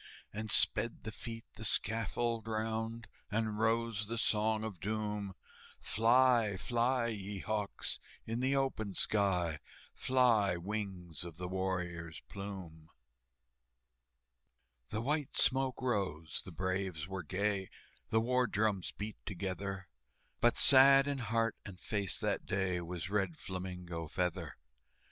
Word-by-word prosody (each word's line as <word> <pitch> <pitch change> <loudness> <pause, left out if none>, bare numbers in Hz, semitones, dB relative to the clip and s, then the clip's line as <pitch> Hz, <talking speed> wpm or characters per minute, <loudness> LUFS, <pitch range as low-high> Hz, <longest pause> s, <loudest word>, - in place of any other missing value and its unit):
And 110 +1 -4
sped 115 +1 +2
the 110 - -4
feet 115 0 -6
the 110 - -6
scaffold 115 +1 0
round, 110 +1 -2 0.2
And 110 0 -1
rose 110 -2 +1
the 115 +2 -3
Song 110 -1 +2
of 105 -6 -5
Doom, 105 -1 -2 0.4
"Fly, 115 -2 +4
fly, 120 +3 +1
ye 100 -2 -4
hawks, 105 +1 -2 0.3
in 115 +1 -2
the 130 +2 +2
open 110 -8 -1
sky, 90 -7 +2 0.3
Fly, 115 -8 +3
wings 95 -3 -4
of 85 -2 -8
the 90 0 -4
warrior's 90 -4 -2
plume!" 95 -6 -7 2.0
The 110 - -2
white 145 +3 -1
smoke 130 -1 +3
rose, 95 - -1
the 95 - -7
braves 95 -2 -2
were 95 -1 -4
gay, 95 +3 -1 0.4
The 110 - +4
war 125 +1 +2
drums 105 -3 +1
beat 105 +1 -5
together, 95 0 -3 0.5
But 120 - +4
sad 135 +1 +8
in 140 -1 -1
heart 115 -1 +1
and 95 -3 -9
face 100 0 -1
that - - -1
day 95 -2 0
Was 90 +1 -5
Red 95 -5 0
Flamingo 90 -3 -5
Feather. 90 +1 -2
105 Hz, 125 wpm, -34 LUFS, 95-115 Hz, 2.0 s, sad